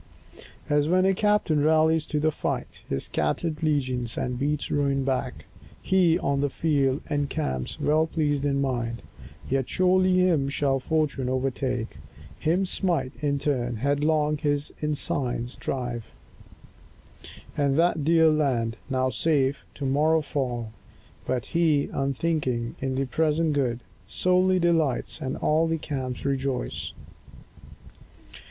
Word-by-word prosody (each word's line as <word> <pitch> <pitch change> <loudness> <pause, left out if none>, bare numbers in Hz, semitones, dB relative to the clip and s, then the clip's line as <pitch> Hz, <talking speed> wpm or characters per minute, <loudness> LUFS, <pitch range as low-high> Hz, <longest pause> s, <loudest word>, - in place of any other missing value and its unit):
As 150 0 +2
when 185 +1 +4
a 195 - +4
captain 205 -7 +2
rallies 160 0 +3
to 150 - -1
the 155 +1 +2
fight - - -4
His 70 - -1
scattered 150 - -2
legions, 130 -6 -1
and 125 0 -2
beats 145 +1 -1
ruin 140 -2 +1
back, 130 -1 -2 0.3
He, 180 -3 +3
on 140 -5 0
the 145 - +1
field, 140 -2 +1
encamps, 145 - -2
well 155 +2 +2
pleased 145 -3 0
in 140 -1 +1
mind. 120 -4 -2 0.4
Yet 135 -1 -1
surely 185 0 +3
him 170 -7 +3
shall 140 -1 +1
fortune 145 -3 -1
overtake, 130 -2 -2 0.4
Him 175 +5 +1
smite 175 -7 -1
in 140 -1 +1
turn, 125 -4 -1
headlong 150 +4 +1
his 145 -1 -1
ensigns 130 -5 -2
drive; 120 -3 -3 1.5
And 140 -1 +1
that 165 -2 +2
dear 160 +1 +5
land, 125 -7 0
now 130 -1 +1
safe, 140 -2 +1
to 140 - -5
morrow 155 +4 +2
fall. 120 -6 -3 0.6
But 130 -2 -1
he, 160 -4 +1
unthinking, 135 -4 -1
in 135 -1 -1
the 135 +1 0
present 155 +4 +1
good 125 -4 0 0.3
Solely 185 +1 +2
delights, 165 -6 +1
and 130 0 -3
all 160 +2 +2
the 165 0 0
camps 130 -5 -4
rejoice. 135 - -2
145 Hz, 130 wpm, -26 LUFS, 130-160 Hz, 1.5 s, dear